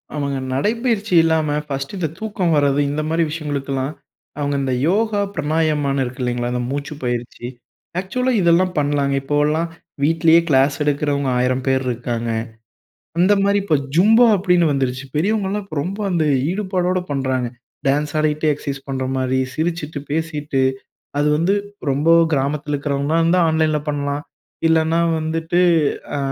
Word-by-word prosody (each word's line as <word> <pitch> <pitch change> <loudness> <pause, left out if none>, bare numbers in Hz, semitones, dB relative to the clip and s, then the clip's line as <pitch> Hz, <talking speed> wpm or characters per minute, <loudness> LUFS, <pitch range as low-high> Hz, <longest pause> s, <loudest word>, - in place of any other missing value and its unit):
அவங்க 140 -2 -2 0.2
நடைப்பயிற்சி 220 - 0
இல்லாம 160 -2 +1 0.2
ஃபஸ்ட்டு 135 +5 -4
இந்த 175 -3 -1
தூக்கம் 200 -6 -1
வரது, 140 -1 +2
இந்த 150 +1 -1
மாரி 165 +1 +2
விஷயங்களுக்குல்லாம். 140 -3 -3 0.5
அவங்க 145 -1 -1
இந்த 130 -1 -1
யோகா 210 +2 +1
பிரமாயமான்னு 150 -3 0
இருக்கு 125 +1 -7
இல்லைங்களா? 120 0 -1
இந்த 125 - -1
மூச்சுப்பயிற்சி, 125 -4 -4 0.5
ஆக்சுவலா 250 +8 -1
இதெல்லாம் 180 +1 +3
பண்ணலாங்க. 145 -1 +1
இப்போலாம் 150 +4 +1 0.3
வீட்லயே 165 +2 +5
கிளாஸ் 135 0 +4
எடுக்குறவங்க 145 -1 0
1000 125 +1 0
பேர் 130 0 +2
இருக்காங்க. 120 -1 -3 0.9
அந்த 185 +4 +4
மாரி 200 +1 +3
இப்ப 160 -6 +2 0.2
ஜும்பா 220 +8 +6
அப்படின்னு 180 -2 +3
வந்துருச்சு. 130 -1 -1
பெரியவங்கலாம் 200 +3 0
இப்ப 185 -5 -9
ரொம்ப 195 +4 -4
அந்த 170 -3 +1 0.3
ஈடுபாடோட 185 -2 0
பண்றாங்க. 130 -3 -1 0.4
டான்ஸ் 145 +2 +1
ஆடிகிட்டே 155 0 +1
எக்ஸசைஸ் 140 -1 -5
பண்ணுற 130 -1 -2
மாரி, 130 0 0 0.2
சிரிச்சுட்டு, 160 0 -2
பேசிட்டு. 150 -3 -1 0.6
அது 145 +1 +2
வந்து 170 +6 +2 0.4
ரொம்போ 145 +5 +3 0.2
கிராமத்துல 145 +1 -1
இருக்கிறவங்களா 140 +2 -1
இருந்தா 170 +2 +3
ஆன்லைன்ல 160 -1 +2
பண்ணலாம். 145 0 -2 0.5
இல்லன்னா 160 +1 +2 0.2
வந்துட்டு 160 +2 -1 0.6
ஆ - - -1
150 Hz, 130 wpm, -20 LUFS, 140-170 Hz, 0.9 s, ஜும்பா